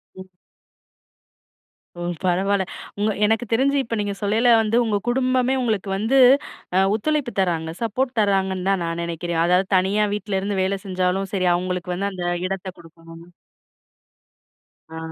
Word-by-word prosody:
ம். 185 0 -12 1.7
ஓ! - - -5 0.2
பரவால்ல. 190 +2 +1 0.3
உங்க 210 +1 +1
எனக்கு 225 +2 +1
தெரிஞ்சி 275 +4 +2
இப்ப 230 -1 -4
நீங்க 205 -1 -2
சொல்லேல 220 +4 +3
வந்து 220 0 0
உங்க 215 -3 0
குடும்பமே 255 +1 +1
உங்களுக்கு 215 -5 -1
வந்து, 225 +7 +1 0.6
அ - - +4 0.2
ஒத்துழைப்பு 285 +3 -1
தராங்க, 165 -4 0
சப்போர்ட் 245 +3 -1
தராங்கன்னு 190 -2 0
தான் 195 -2 +1
நான் 165 0 -3
நினைக்கிறேன். 170 0 -2
அதாவது 180 +2 +2
தனியா 200 +3 +2
வீட்ல 205 -2 -2
இருந்து 200 0 -2
வேலை 195 +1 0
செஞ்சாலும் 185 0 -1
சரி, 185 -2 +1
அவுங்களுக்கு 180 0 -3
வந்து 200 +2 -2
அந்த 180 -1 -5 0.2
இடத்த 195 0 -5
குடுக்கணும்னு. 165 +1 -15 1.6
ஆ. 160 - -9
195 Hz, 140 wpm, -22 LUFS, 180-220 Hz, 1.7 s, அ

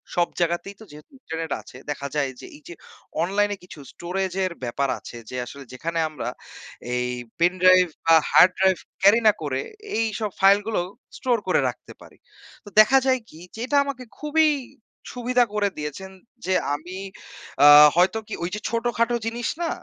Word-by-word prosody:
সব 175 -1 +2
জায়গাতেই 175 +3 -1
তো - - -11
যেহেতু 150 - -15
ইন্টারনেট 165 - -6
আছে, 110 - -14
দেখা 140 -1 -5
যায় 140 -3 0
যে - - -10
এই 150 - -21
যে 170 - -7 0.5
অনলাইনে 205 +2 0
কিছু 180 -4 -12
স্টোরেজ 185 +1 -3
এর 185 - -3
ব্যাপার 135 +3 -1
আছে 120 - -10
যে 125 - -7
আসলে 140 +3 -10
যেখানে 165 +5 -3
আমরা 155 - -5 0.7
এই 125 0 -1 0.3
পেনড্রাইভ 185 +1 +5 0.2
বা 165 - +6 0.2
হার্ড 180 - +7
ড্রাইভ 190 -1 +3 0.2
ক্যারি 205 +5 +6
না 215 - +8
করে 135 -2 -2 0.4
এইসব 220 -1 -1
ফাইল 195 +1 +6
গুলো 215 -5 0 0.4
স্টোর 245 -3 +1
করে - - +3
রাখতে - - -11
পারি। - - -16 0.5
তো - - -10
দেখা 265 +5 +4
যায় 260 -1 +2
কি? 155 - -14 0.2
যে - - -10
এটা 285 +3 +1
আমাকে 260 -3 -5 0.2
খুবই 310 +1 +3 0.7
সুবিধা 245 0 +2
করে 205 -1 +1
দিয়েছেন 150 +6 -6 0.3
যে 185 - 0 0.2
আমি 180 +5 -8 0.7
আ - - +10 0.3
হয়তো 185 +5 +3
কি? - - -7
ওই 175 - -2
যে - - -5
ছোটখাটো 235 0 0
জিনিস 235 +1 -3
না 335 - 0
190 Hz, 175 wpm, -23 LUFS, 165-225 Hz, 0.7 s, আ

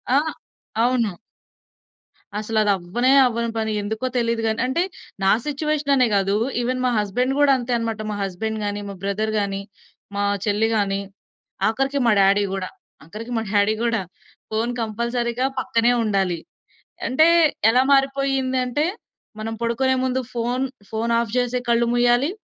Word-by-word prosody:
ఆ! 280 - +6 0.6
అవును. 235 -5 +1 1.3
అసల 220 +1 -3
అదవ్వనే 200 +6 +1
అవ్వని 235 -1 -1
పని. 220 -1 -1
ఎందుకో 220 +4 -3
తెలీదు 230 -1 0
గాని, 220 0 -1
అంటే 310 +7 +1 0.4
నా 195 - +5
సిట్యుయేషననే 285 -3 +1
గాదు. 195 0 +2 0.3
ఈవెన్ 255 +1 -1
మా 250 - +2
హస్బెండ్ 245 +6 0
గూడా 290 -1 +5
అంతే 245 0 -4
అన్నమాట. 225 -2 -3
మా 210 - -3
హస్బెండ్ 220 +4 -3
గాని, 205 0 -2
మా 200 - -7
బ్రదర్ 215 +2 -1
గాని, 195 -1 -2 0.5
మా 205 - 0 0.2
చెల్లి 210 +2 +2
గాని, 200 -2 0 0.7
ఆఖరికి 270 +5 0
మా - - +5
డ్యాడీ 200 +1 +4
గూడా, 190 -1 -3 0.3
ఆఖరికి 215 +10 -8
మా 225 - -1
డ్యాడీ 205 +1 +3
గూడా. 230 -3 +1 0.5
ఫోను 230 +3 -1
కంపల్సరీ‌గా 235 +3 -1
పక్కనే 235 -1 +2
ఉండాలి. 195 -5 0 0.7
అంటే 310 +5 +4 0.4
ఎలా 250 +3 +4
మారిపోయిందంటే, 270 0 +1 0.5
మనం 225 +1 -4
పడుకునే 260 +3 +1
ముందు 260 0 0 0.7
ఫోను 230 +1 0
ఆఫ్ 230 -2 -3
జేసి 250 0 +1
కళ్ళు 235 0 +3
మూయాలి. 245 +4 +3
230 Hz, 135 wpm, -22 LUFS, 210-255 Hz, 1.3 s, ఆ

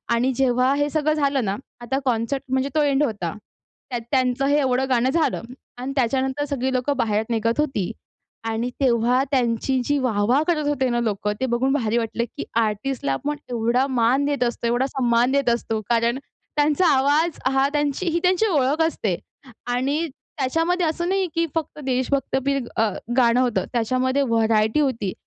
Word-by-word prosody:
आणि 250 +3 +1
जेव्हा 255 0 +2
हे 290 0 0
सगळं 310 0 +1
झालं 280 -5 +1
ना 195 +1 -1 0.3
आता 265 +3 -1
कॉन्सर्ट 245 +3 0
म्हणजे 265 +1 0
तो 305 - +4
एंड 285 0 +2
होता. 205 - -2 0.6
त्यात 240 -2 -3
त्यांचं 255 0 +1
हे 285 +1 +3
एवढं 265 -1 +1
गाणं 250 0 +2
झालं 325 +3 +1 0.4
आणि 260 +2 -4
त्याच्यानंतर 265 +3 0
सगळी 265 -2 -2
लोकं 255 +3 0
बाहेर 215 -1 +1
निघत 230 +3 0
होती 265 -10 0 0.6
आणि 230 +2 -1
तेव्हा 245 +1 +3
त्यांची 255 0 +1
जी 290 0 +1
वाह-वाह 240 +2 +2
करत 305 -4 +1
होते 265 -3 +1
ना 240 0 0
लोकं. 210 -2 -1
ते - - +2
बघून 260 +3 +1
भारी 235 -4 0
वाटलं 235 0 -1
की - - -3 0.2
आर्टिस्टला 215 - -1
आपण 295 - -3
एवढा 240 +3 +1
मान 255 +2 +2
देत 285 -3 0
असतो, 235 -1 -1
एवढा 245 +3 +1
सन्मान 245 -1 +1
देत 280 -3 +2
असतो 225 -2 -1
कारण 235 +2 +2 0.4
त्यांचा 300 +4 +3
आवाज 295 +5 +2
हा 270 +1 +3
त्यांची 295 +4 -1
ही 340 +1 0
त्यांची 370 +4 +3
ओळख 295 -2 +1
असते. 200 - -2 0.5
आणि 265 +6 0 0.4
त्याच्यामध्ये 330 +7 +1
असं 345 +3 -2
नाही 385 -1 +1
की 335 0 +2
फक्त 310 -1 -3
देशभक्तीपर 270 +1 0 0.2
अ, 220 -1 +3 0.3
गाणं 240 0 +4
होतं, 245 -3 0
त्याच्यामध्ये 255 +4 +1
व्हरायटी 225 0 +2
होती. 230 -9 0
260 Hz, 170 wpm, -23 LUFS, 235-285 Hz, 0.6 s, तो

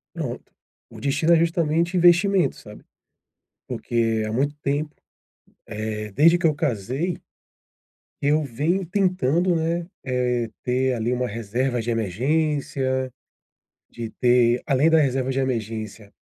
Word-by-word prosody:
Pronto, - - -5 0.4
o - - -12
destino 155 +4 +2
é - - +7
justamente 170 +1 +1
investimento, 175 -2 +4
sabe. 105 0 -13 0.8
Porque 115 -2 -1
há - - -4
muito 140 +5 0
tempo, 145 +2 -1 0.7
eh, 105 -1 -5
desde 165 - +5
que 175 - -3
eu 155 - +4
casei 145 - -2 1.1
eu 150 +2 +2
venho 155 +9 -1
tentando, 180 -2 +1
né, 165 +1 -1 0.2
eh, 125 -2 0
ter, 130 +1 0
ali, 120 +1 -1
uma 125 0 -1
reserva 120 +3 -2
de 120 - -4
emergência, 130 - 0 0.8
de 115 -2 -7
ter 120 -1 +3
além 140 +2 +3
da 160 -1 +5
reserva 135 -2 +1
de 135 - -1
emergência 110 -4 -4
130 Hz, 125 wpm, -23 LUFS, 115-160 Hz, 1.1 s, é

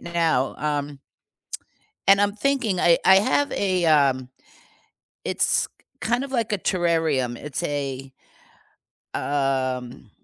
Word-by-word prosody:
now, 165 -6 0
um 145 -1 -3 1.1
and 195 +1 +6
I'm 205 0 +1
thinking 225 -5 0
I 170 -1 +4
I 190 - +7
have 260 +8 +2
a, 185 -3 0
um 135 -5 +2 1.0
it's - - +1
k - - -41 0.3
kind 240 +3 0
of 275 - -7
like 230 -4 -1
a 205 - -1
terrarium, 160 -9 0
it's 145 +3 -5
a 135 -2 -4 1.0
um, 130 -5 -2
160 Hz, 115 wpm, -23 LUFS, 135-195 Hz, 1.1 s, I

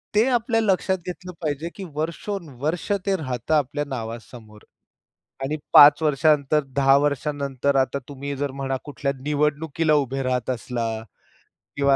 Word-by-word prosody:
ते 215 +2 +5
आपल्या 235 -2 +1
लक्षात 190 -2 +1
घेतलं 180 0 -6
पाहिजे, 155 +1 -2
की 200 - -7
वर्षोनवर्ष 160 -1 -3
ते 195 -1 +2
राहतं 130 -2 -3
आपल्या 145 0 0
नावासमोर 115 -3 -8 0.8
आणि 145 +3 -1 0.2
5 145 +2 +9
वर्षानंतर, 150 0 +3
10 135 0 +3
वर्षानंतर 140 -1 -1
आता 135 +1 +1
तुम्ही 140 0 -5
जर 140 0 -2
म्हणा 135 -1 -1
कुठल्या 145 -1 -3
निवडणुकीला 150 +2 +1
उभे 135 +1 -4
राहत 125 -1 -1
असला 120 -1 -2 0.9
किंवा 140 -1 +3
145 Hz, 130 wpm, -23 LUFS, 135-155 Hz, 0.9 s, 5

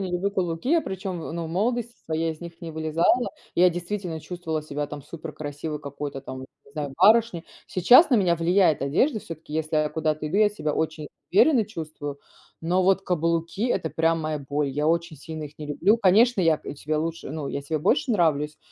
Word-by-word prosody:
не 190 -2 -3
люблю 180 +3 0
каблуки. 175 +3 -2
Я, 335 0 +5
причем, 190 - -5
ну, 165 +1 -5
в - - -5
молодости 235 +7 -1
своей, 160 +1 -1
из 155 - -15
них 170 0 -10
не 170 -2 -6
вылезала. 160 +10 +1 0.3
Я 180 +1 +6
действительно 175 -1 -4
чувствовала 165 -3 -4
себя 145 -1 -4
там 145 -1 -8
супер 160 +1 -8
красивой, 150 +1 -5
какой-то 140 -1 -6
там, 130 -1 -8
не 140 +1 -15
знаю, 145 -2 -4
барышней. 210 -2 +4 0.2
Сейчас 245 - +6
на - - +5
меня 180 -5 +3
влияет 170 -2 +3
одежда, 215 - +1
всё-таки, 165 -3 -10
если 155 0 -1
я 155 0 +2
куда-то 155 0 -1
иду, 160 +6 -2
я 215 -1 +6
себя 180 -8 -3
очень 155 -1 -2 0.3
уверенно 235 - +5
чувствую. 155 -7 -7 0.4
Но 180 +3 +1
вот 195 +1 +3
каблуки- 170 +4 0
это 160 - -1
прям 165 0 +1
моя 155 -1 -2
боль, 145 +1 -2
я 150 +3 -1
очень 170 0 0
сильно 155 +2 -7
их 150 +1 -12
не 150 - -6
люблю. 185 +9 +3
Конечно, 215 +2 +4
я, 165 -3 +3
э, - - -6
себе 150 +2 -3
лучше 165 -2 -3
ну 150 -2 -4
я - - -3
себе 155 +2 -2
больше 245 - +1
нравлюсь, 150 -5 +1
165 Hz, 200 wpm, -25 LUFS, 150-185 Hz, 0.4 s, Я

